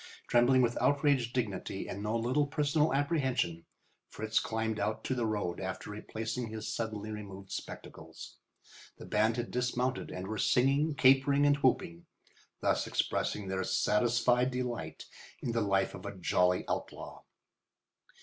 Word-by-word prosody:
Trembling 125 +2 +5
with 120 0 0
outraged 140 -4 +2
dignity 100 -6 -3
and 100 - -5
no 105 +2 0
little 130 +6 +1
personal 150 +1 +1
apprehension, 135 - 0 0.4
Fritz 110 0 0
climbed 110 -1 -2
out 110 - -1
to - - -1
the 120 -3 0
road 100 -5 -2
after 95 +2 -5
replacing 110 +3 -4
his 110 0 -5
suddenly 110 -2 -4
removed 100 -2 -8
spectacles. - - -8 0.6
The - - -10
band 110 +2 +2
had 120 0 -3
dismounted 125 +1 -1
and 90 - -5
were 110 +1 -4
singing, 140 +4 +3
capering, 135 +1 +5
and 145 0 +4
whooping, 85 -11 0 0.5
thus - - +1
expressing 105 -2 -1
their 95 0 -1
satisfied 120 +5 +2
delight 120 -11 -4 0.3
in 120 - -2
the 115 0 0
life 95 -2 +1
of - - -8
a - - -7
jolly 90 0 +2
outlaw. - - -5
115 Hz, 140 wpm, -31 LUFS, 105-130 Hz, 0.6 s, Trembling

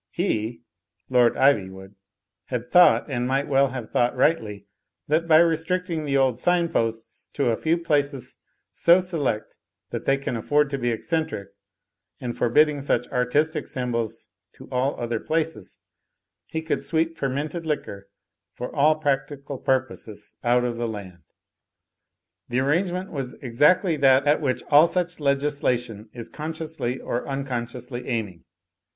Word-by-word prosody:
He 120 - -2 0.5
(Lord 125 -2 +4
Ivy 125 -9 +4
wood) 95 +1 -12 0.5
had 125 -2 -3
thought, 175 +8 +5
and 125 -4 -2
might 135 +2 0
well 140 -1 +3
have 125 -3 -7
thought 120 +1 +1
rightly, 110 -8 0 0.4
that 160 +3 +1
by 155 -1 +7
restricting 165 0 +1
the 140 -1 +1
old 130 -3 +2
sign 175 +1 +2
posts 115 -3 -3
to 140 -5 +1
a - - +1
few 160 +7 +1
places 145 -5 -1 0.3
so 170 +2 +5
select 160 -12 -2 0.4
that - - -4
they 135 - +3
can 135 -2 -4
afford 145 +5 +1
to 140 - -2
be 120 -1 0
eccentric, 140 - -2 0.7
and 120 -2 -4
forbid 120 +6 +4
ding 150 -2 -4
such 140 - 0
artistic 145 +5 0
s)mibols 120 -3 -3 0.3
to - - -14
all 130 +2 0
other 120 -1 -2
places, 160 - -2 0.7
he 160 0 -4
could 160 - -2
sweep 165 0 0
fermented 150 +4 -3
liquor 100 -10 -4 0.5
for 125 - -6
all 150 +2 +4
practical 140 -2 -2
purposes 130 -5 -2
out 120 0 +3
of 120 -1 -2
the 120 0 -1
land. 95 -5 -8 1.3
The 120 +1 0
arrangement 180 +6 0
was 135 -4 -4
exactly 150 - +2
that 135 -1 +5
at 150 +2 +3
which 130 -4 -1
all 150 +3 +8
such 180 -1 -2
legislation 135 -6 -1
is 120 -2 -8
consciously 155 -4 -4
or 120 - -3
uncon 135 -4 -3
sciously 120 +1 -8
aiming. 105 -8 -3
135 Hz, 145 wpm, -24 LUFS, 120-155 Hz, 1.3 s, all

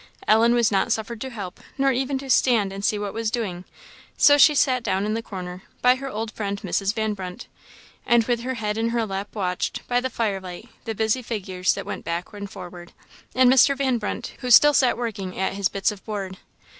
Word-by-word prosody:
Ellen 230 +2 +5
was 235 -2 +3
not 195 +3 +1
suffered 225 +1 -2
to 265 - -4
help, 200 -7 -7 0.2
nor 275 0 +3
even 265 +2 -1
to 270 0 -8
stand 220 -8 +3
and 195 0 -7
see 210 - +1
what 205 -1 -4
was 225 -1 -1
doing; 200 -7 -4 0.5
so 290 - +7
she 290 +1 +6
sat 255 -3 +2
down 195 -3 -1
in 215 - -1
the 225 - -2
corner, 180 -4 -7 0.2
by 250 0 +7
her 270 +1 -6
old 220 -1 -4
friend 200 -2 -4
Mrs. 200 +1 -1
Van 220 -1 0
Brunt, 185 +3 -7 0.6
and 235 -1 +4
with 240 0 0
her 260 +2 -3
head 210 -1 -2
in 230 +1 +1
her 230 -1 0
lap 200 +1 -5
watched, 180 -3 -3
by 245 0 +2
the 260 +1 -2
fire 210 -6 -2
light, 180 +4 -9 0.2
the 225 - -3
busy 220 +4 +1
figures 190 -6 -1
that - - -6
went - - -6
back 170 +4 -4
and 200 -1 -7
forward, 175 -2 -10 0.4
and 255 0 +5
Mr. 270 +2 +5
Van 260 -3 +1
Brunt, 210 - -4
who 250 - -4
still 295 +5 +8
sat 260 -4 +3
working 205 -6 -4
at 190 0 -1
his 200 0 0
bits 195 +2 0
of 205 -2 -11
board. 195 -3 -5
220 Hz, 220 wpm, -23 LUFS, 195-245 Hz, 0.6 s, still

